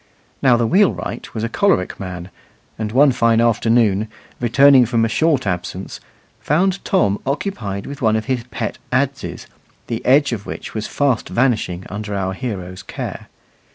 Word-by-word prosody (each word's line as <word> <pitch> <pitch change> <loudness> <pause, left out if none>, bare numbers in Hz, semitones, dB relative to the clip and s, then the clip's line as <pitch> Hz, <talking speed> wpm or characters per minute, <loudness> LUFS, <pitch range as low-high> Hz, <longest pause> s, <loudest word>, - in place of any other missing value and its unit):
Now 125 -3 +5
the 115 - +1
wheelwright 190 - 0
was 110 - -3
a - - +1
choleric 170 - +1
man, 90 -1 -7 0.5
and 110 -1 -3
one 135 +4 +5
fine 115 -2 +2
afternoon, 115 -2 +2 0.3
returning 130 +3 +6
from 115 -1 +2
a - - +1
short 145 +1 +1
absence, 90 0 -4 0.4
found 185 +6 +1
Tom 105 - +1
occupied 125 - -3
with 140 0 -8
one 110 -2 +3
of 110 -1 -1
his 130 -3 -1
pet 115 -3 -5
adzes, 135 +1 -1 0.4
the 115 - -4
edge 140 +2 +4
of 105 -4 -5
which - - -7
was 110 -1 -3
fast 140 -6 0
vanishing 110 -8 0
under 105 +1 -5
our 95 -1 -1
hero's 95 -5 -5
care. - - -7
115 Hz, 155 wpm, -19 LUFS, 100-135 Hz, 0.5 s, returning